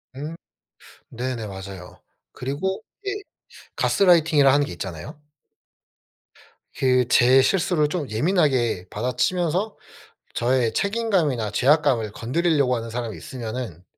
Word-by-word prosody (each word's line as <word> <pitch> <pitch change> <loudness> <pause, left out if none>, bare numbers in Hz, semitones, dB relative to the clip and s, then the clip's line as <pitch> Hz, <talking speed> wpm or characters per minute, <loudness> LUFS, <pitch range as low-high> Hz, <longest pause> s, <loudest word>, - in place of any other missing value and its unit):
음. 150 +4 -6 0.7
네네. 120 -2 -4
맞아요. 95 -2 -9 0.3
그리고 155 - -3 0.2
예 400 - -1 0.6
가스라이팅이라 160 -7 +4
하는 145 0 +3
게 - - -7
있잖아요. 95 - -7 1.6
그 125 -1 +2
제 125 +2 +5
실수를 170 -2 +2
좀 150 -2 -3
예민하게 125 - +1
받아치면서 170 - -1 0.6
저의 120 -1 +1
책임감이나 190 - 0
죄악감을 130 -5 +2
건드리려고 140 +2 +1
하는 115 -1 -5
사람이 115 -1 -4
있으면은 115 -7 -6
130 Hz, 275 characters per minute, -23 LUFS, 115-160 Hz, 1.6 s, 제